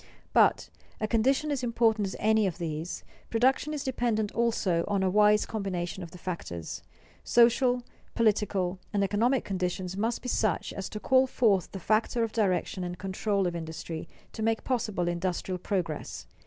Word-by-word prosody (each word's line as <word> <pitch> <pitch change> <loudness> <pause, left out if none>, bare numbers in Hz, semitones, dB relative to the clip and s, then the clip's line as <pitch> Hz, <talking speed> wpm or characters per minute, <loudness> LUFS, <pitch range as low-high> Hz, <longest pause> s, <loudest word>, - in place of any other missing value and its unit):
But - - +4 0.3
a 215 - 0
condition 265 +7 +2
as 280 -3 -1
important 225 -3 +2
as 190 - -6
any 220 -1 +3
of 180 - -4
these 165 0 -4 0.3
production 260 +6 +2
is 295 -2 -3
dependent 235 -5 0
also 220 -7 +1
on 200 -2 +1
a 185 - +2
wise 210 +1 +5
combination 190 -4 -3
of 170 - -7
the 180 - -12
factors. 160 - -5 0.4
Social, 245 +1 +4 0.3
political, 200 -5 +1
and 200 -1 +2
economic 230 +6 +1
conditions 185 -1 -2
must 225 +4 -1
be - - -5
such 215 -3 0
as 195 - -5
to 210 - -6
call 260 +3 +4
forth 210 -8 +2
the 195 - -6
factor 220 +5 +1
of 225 - -2
direction 190 -4 0
and 175 0 -4
control 195 +1 -1
of 175 -1 -1
industry, 160 0 -6 0.2
to - - -6
make 225 0 +1
possible 215 -8 -1
industrial 180 +1 -2
progress. 175 -5 -3
205 Hz, 165 wpm, -28 LUFS, 180-230 Hz, 0.4 s, wise